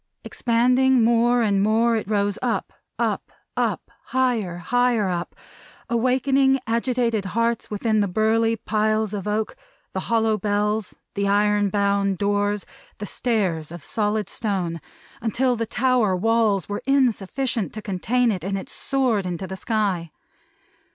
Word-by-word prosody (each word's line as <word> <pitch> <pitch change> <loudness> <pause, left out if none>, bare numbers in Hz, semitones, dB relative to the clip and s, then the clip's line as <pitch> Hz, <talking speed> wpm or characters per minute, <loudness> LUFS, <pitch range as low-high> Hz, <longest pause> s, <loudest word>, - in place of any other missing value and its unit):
Expanding 250 +1 +2
more 235 +1 +3
and 200 -3 +2
more, 225 +3 +3
it 220 - -2
rose 205 -1 0
up, 240 -2 -2 0.2
up, - - -1
up, - - -29 0.2
up; - - -1
higher, 235 -9 0
higher, 245 +4 +1
higher 190 - 0
up; 175 -1 -3 0.6
awakening 265 +3 +3
agitated 230 -1 0
hearts 230 +4 -1
within 215 +1 0
the 205 - +2
burly 220 +4 +2
piles 215 -1 0
of 205 -1 -4
oak, 215 +1 -1 0.4
the 190 - -1
hollow 225 -2 +2
bells, 210 +1 -1 0.2
the 200 0 -1
iron 205 0 +2
bound 200 -1 +1
doors, 205 +1 0 0.3
the 205 - -5
stairs 190 -10 -1
of 170 -3 -9
solid 210 -1 -1
stone; 180 -7 -3 0.4
until 245 +3 +1
the 230 -1 -3
tower 245 -5 +2
walls 215 -1 +2
were 205 0 -4
insufficient 255 -3 +1
to 220 - -6
contain 225 +5 +1
it, 185 -5 -4
and 195 +1 -2
it 190 - -7
soared 250 -8 0
into 180 +1 -4
the 190 - -6
sky. 195 -5 -1
215 Hz, 145 wpm, -23 LUFS, 200-235 Hz, 0.6 s, more